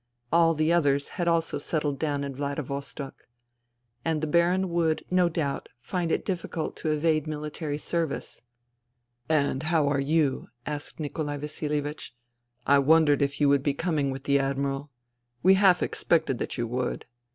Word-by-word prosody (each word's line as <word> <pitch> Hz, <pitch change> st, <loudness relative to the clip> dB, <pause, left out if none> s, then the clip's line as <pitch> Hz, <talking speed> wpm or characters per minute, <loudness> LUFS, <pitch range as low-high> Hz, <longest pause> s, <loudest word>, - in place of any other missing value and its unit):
All 165 Hz, -1 st, +5 dB
the 155 Hz, +2 st, +2 dB
others 140 Hz, -4 st, +2 dB
had 175 Hz, -, -3 dB
also 165 Hz, -1 st, +1 dB
settled 145 Hz, -4 st, -2 dB
down 145 Hz, -3 st, -1 dB
in 140 Hz, -1 st, -4 dB
Vladivostok. 140 Hz, -1 st, -5 dB, 0.8 s
And 160 Hz, -1 st, 0 dB
the 155 Hz, -, -1 dB
Baron 175 Hz, +4 st, +2 dB
would, 165 Hz, -2 st, 0 dB
no 180 Hz, -1 st, +4 dB
doubt, 150 Hz, -4 st, -2 dB
find 170 Hz, +6 st, -2 dB
it -, -, 0 dB
difficult 170 Hz, -4 st, -3 dB
to 155 Hz, -, -2 dB
evade 155 Hz, 0 st, +1 dB
mihtary 150 Hz, 0 st, -4 dB
service. 165 Hz, -2 st, -3 dB, 0.9 s
"And 140 Hz, -4 st, +2 dB
how 155 Hz, -2 st, +2 dB
are 140 Hz, -1 st, +1 dB
you?" 145 Hz, -1 st, +1 dB, 0.2 s
asked 150 Hz, +1 st, -5 dB
Nikolai 145 Hz, -1 st, -3 dB
Vasilievich. 150 Hz, -2 st, -4 dB, 0.3 s
" 120 Hz, 0 st, -43 dB
I -, -, +6 dB
wondered 150 Hz, 0 st, +4 dB
if 140 Hz, 0 st, 0 dB
you 145 Hz, -, +4 dB
would 140 Hz, -1 st, +4 dB
be 140 Hz, 0 st, 0 dB
coming 155 Hz, -4 st, 0 dB
with 135 Hz, 0 st, -5 dB
the 140 Hz, 0 st, +3 dB
Admiral. 140 Hz, +1 st, -1 dB, 0.5 s
We 190 Hz, -, +7 dB
half 190 Hz, -2 st, +5 dB
expected 160 Hz, -7 st, +1 dB
that -, -, -3 dB
you 120 Hz, -, 0 dB
would. 125 Hz, +2 st, -3 dB
150 Hz, 160 wpm, -27 LUFS, 140-165 Hz, 0.9 s, We